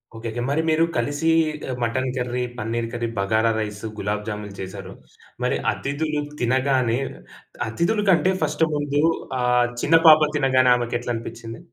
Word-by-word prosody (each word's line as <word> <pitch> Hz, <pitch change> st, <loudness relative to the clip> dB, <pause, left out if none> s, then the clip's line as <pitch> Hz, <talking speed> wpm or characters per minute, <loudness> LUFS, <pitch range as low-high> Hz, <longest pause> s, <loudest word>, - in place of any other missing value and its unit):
Okay. 115 Hz, +1 st, -5 dB
మరి 145 Hz, +3 st, +1 dB
మీరు 160 Hz, +1 st, +3 dB
కలిసి 145 Hz, +7 st, 0 dB, 0.4 s
ఆహ్, 125 Hz, -, -3 dB
mutton 130 Hz, +3 st, -1 dB
curry, 125 Hz, 0 st, -2 dB
paneer 115 Hz, +1 st, -2 dB
curry, 120 Hz, -1 st, -2 dB
bagara 110 Hz, +3 st, +2 dB
rice, 105 Hz, 0 st, -4 dB
gulab 105 Hz, +1 st, -2 dB
jamun 105 Hz, -2 st, -5 dB
చేశారు. 95 Hz, 0 st, -7 dB, 0.5 s
మరి -, -, +1 dB, 0.2 s
అతిథులు 150 Hz, +2 st, -2 dB, 0.2 s
తినగానే 130 Hz, -1 st, +2 dB, 0.7 s
అతిధుల 170 Hz, -, 0 dB
కంటే 180 Hz, +2 st, +3 dB
ఫస్ట్ -, -, 0 dB
ముందు 145 Hz, 0 st, 0 dB, 0.4 s
ఆ -, -, 0 dB, 0.4 s
చిన్న 165 Hz, +2 st, +5 dB
పాప 155 Hz, 0 st, +9 dB
తినగానే 130 Hz, -3 st, +3 dB
ఆమెకెట్ల 120 Hz, 0 st, -3 dB
అనిపించింది? 115 Hz, 0 st, -7 dB
120 Hz, 140 wpm, -23 LUFS, 115-145 Hz, 0.7 s, పాప